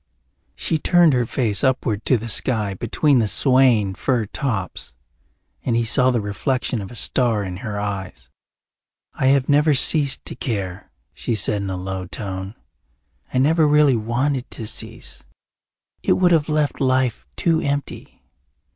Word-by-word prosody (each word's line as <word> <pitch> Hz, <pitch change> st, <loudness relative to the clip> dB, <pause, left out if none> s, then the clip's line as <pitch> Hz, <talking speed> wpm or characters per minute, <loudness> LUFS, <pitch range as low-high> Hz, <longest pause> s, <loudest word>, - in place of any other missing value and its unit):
She 160 Hz, -, -1 dB
turned 175 Hz, -1 st, +4 dB
her 125 Hz, -2 st, +1 dB
face 110 Hz, -7 st, 0 dB
upward 125 Hz, -5 st, 0 dB
to 130 Hz, -, +4 dB
the 115 Hz, +1 st, -7 dB
sky 110 Hz, -3 st, +1 dB
between 125 Hz, -, +1 dB
the 110 Hz, -, +1 dB
swaying 125 Hz, -4 st, +3 dB
fir 120 Hz, +2 st, -1 dB
tops 100 Hz, -, -4 dB, 0.7 s
and 120 Hz, -, 0 dB
he 115 Hz, 0 st, +1 dB
saw 125 Hz, +3 st, +3 dB
the 125 Hz, -2 st, +1 dB
reflection 110 Hz, +3 st, -2 dB
of 95 Hz, -, -7 dB
a 120 Hz, -, -11 dB
star 115 Hz, -2 st, +1 dB
in 90 Hz, -2 st, -5 dB
her 105 Hz, 0 st, -5 dB
eyes. 95 Hz, -11 st, -6 dB, 0.8 s
"I 130 Hz, -, 0 dB
have 135 Hz, -1 st, +3 dB
never 150 Hz, +1 st, +3 dB
ceased 140 Hz, 0 st, +2 dB
to -, -, -6 dB
care," 95 Hz, -6 st, -4 dB, 0.2 s
she 115 Hz, -, -3 dB
said 105 Hz, 0 st, 0 dB
in 100 Hz, -, -4 dB
a 95 Hz, -, -3 dB
low 95 Hz, 0 st, -5 dB
tone. 95 Hz, +1 st, -6 dB, 0.8 s
"I -, -, -2 dB
never 155 Hz, +4 st, +3 dB
really 150 Hz, -3 st, +4 dB
wanted 125 Hz, +4 st, -1 dB
to 115 Hz, -, -6 dB
cease. -, -, -6 dB, 0.8 s
It -, -, +2 dB
would 180 Hz, -1 st, +3 dB
have 160 Hz, -2 st, +2 dB
left 150 Hz, -2 st, 0 dB
life 130 Hz, -3 st, 0 dB
too 165 Hz, -2 st, +1 dB
empty. 140 Hz, -1 st, -4 dB
120 Hz, 155 wpm, -21 LUFS, 105-140 Hz, 0.8 s, turned